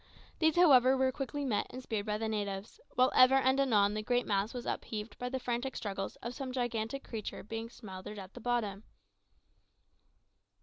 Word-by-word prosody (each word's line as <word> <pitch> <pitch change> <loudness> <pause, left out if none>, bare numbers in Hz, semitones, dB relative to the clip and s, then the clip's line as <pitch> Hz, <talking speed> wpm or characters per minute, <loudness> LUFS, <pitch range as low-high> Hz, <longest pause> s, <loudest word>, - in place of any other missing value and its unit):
These, 315 -1 +3
however, 265 -7 +6
were 260 0 +3
quickly 280 +1 -4
met 225 -6 0
and 255 +1 -8
speared 220 -4 -3
by 210 0 0
the 220 +1 -2
natives, 205 - -3 0.2
while 255 +1 +4
ever 255 +1 +7
and 265 0 +3
anon 210 -7 +4
the 215 - -2
great 245 +3 +1
mass 200 +2 0
was 245 -1 -6
upheaved 210 0 -4
by 250 - -2
the 260 - -2
frantic 250 +1 -2
struggles 195 -2 -4
of 235 - -4
some 265 0 -5
gigantic 240 +1 -2
creature 220 -3 -5
that - - -8
was - - -22
being 225 0 -4
smothered 200 -3 -9
at 190 -1 -9
the 245 - -10
bottom. 220 -4 -1
240 Hz, 190 wpm, -32 LUFS, 210-260 Hz, 0.2 s, ever